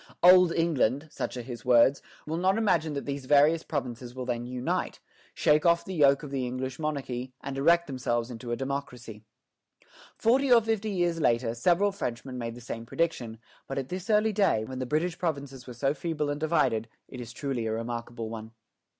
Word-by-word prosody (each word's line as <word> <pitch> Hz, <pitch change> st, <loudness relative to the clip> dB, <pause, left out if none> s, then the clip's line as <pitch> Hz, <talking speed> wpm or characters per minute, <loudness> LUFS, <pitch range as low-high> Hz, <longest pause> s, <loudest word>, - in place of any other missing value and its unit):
"Old 180 Hz, -1 st, +8 dB
England" 155 Hz, -4 st, +1 dB
such -, -, -4 dB
are 120 Hz, -, -5 dB
his 120 Hz, -1 st, -8 dB
words 125 Hz, +2 st, +5 dB, 0.2 s
"will 155 Hz, -, -3 dB
not 190 Hz, +4 st, +2 dB
imagine 165 Hz, -9 st, +1 dB
that 140 Hz, -, -4 dB
these 140 Hz, -1 st, -4 dB
various 150 Hz, +3 st, +5 dB
provinces 125 Hz, -5 st, -5 dB
will 130 Hz, -1 st, -5 dB
then 120 Hz, -1 st, -3 dB
unite, 125 Hz, 0 st, -2 dB, 0.4 s
shake 150 Hz, 0 st, +3 dB
off 170 Hz, -1 st, +3 dB
the 190 Hz, -, -5 dB
yoke 140 Hz, -4 st, +4 dB
of 145 Hz, -, -7 dB
the 135 Hz, -2 st, -1 dB
English 130 Hz, +2 st, -4 dB
monarchy, 130 Hz, -5 st, -3 dB
and 140 Hz, -, -6 dB
erect 170 Hz, +5 st, +4 dB
themselves 120 Hz, -3 st, -2 dB
into 120 Hz, 0 st, -7 dB
a -, -, +1 dB
democracy." 125 Hz, -5 st, -5 dB, 0.9 s
Forty 260 Hz, +4 st, +2 dB
or 240 Hz, -, +9 dB
fifty 220 Hz, -1 st, -1 dB
years 175 Hz, -4 st, 0 dB
later, 115 Hz, -3 st, +2 dB
several 180 Hz, +11 st, +2 dB
Frenchmen 125 Hz, -7 st, -5 dB
made 115 Hz, -1 st, -4 dB
the 120 Hz, -, -11 dB
same 115 Hz, -1 st, -6 dB
prediction; 125 Hz, -8 st, -2 dB, 0.3 s
but 135 Hz, -, -5 dB
at 135 Hz, -1 st, -3 dB
this 185 Hz, +4 st, -6 dB
early 215 Hz, 0 st, +3 dB
day, 190 Hz, -, +2 dB
when 130 Hz, +2 st, -6 dB
the 130 Hz, -, -3 dB
British 165 Hz, +5 st, -1 dB
provinces 140 Hz, -6 st, -4 dB
were 125 Hz, -, -7 dB
so 135 Hz, +4 st, +1 dB
feeble 155 Hz, -2 st, -2 dB
and 145 Hz, -, -3 dB
divided, 130 Hz, -8 st, +1 dB, 0.2 s
it 125 Hz, -, -8 dB
is 120 Hz, -1 st, -8 dB
truly 125 Hz, -3 st, -3 dB
a -, -, -1 dB
remarkable 115 Hz, 0 st, -4 dB
one. 110 Hz, 0 st, -8 dB
135 Hz, 195 wpm, -28 LUFS, 120-165 Hz, 0.9 s, or